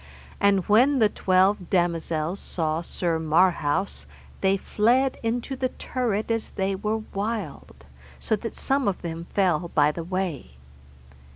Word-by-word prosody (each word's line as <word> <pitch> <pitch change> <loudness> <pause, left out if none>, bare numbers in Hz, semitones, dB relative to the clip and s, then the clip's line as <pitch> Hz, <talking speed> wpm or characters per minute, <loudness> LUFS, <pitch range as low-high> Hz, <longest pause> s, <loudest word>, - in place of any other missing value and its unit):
And 195 -2 +3
when 250 +7 +5
the 220 -4 +4
twelve 185 0 +2
damosels 170 -1 0
saw 160 -1 -2
Sir 170 -1 -2
Marhaus 170 +2 +1 0.3
they 195 0 +3
fled 245 +7 +1
into 240 +4 -2
the 260 0 -1
turret 230 -5 -2
as 225 -1 -2
they 195 0 -1
were 215 +3 -2
wild, 215 +2 -5 0.3
so 220 - 0
that 230 +2 -6
some 275 -2 0
of 195 -2 -2
them 165 0 -5
fell 180 -4 +2
by 150 0 +4
the 165 +2 -6
way. 175 - -4
190 Hz, 135 wpm, -25 LUFS, 170-220 Hz, 0.3 s, when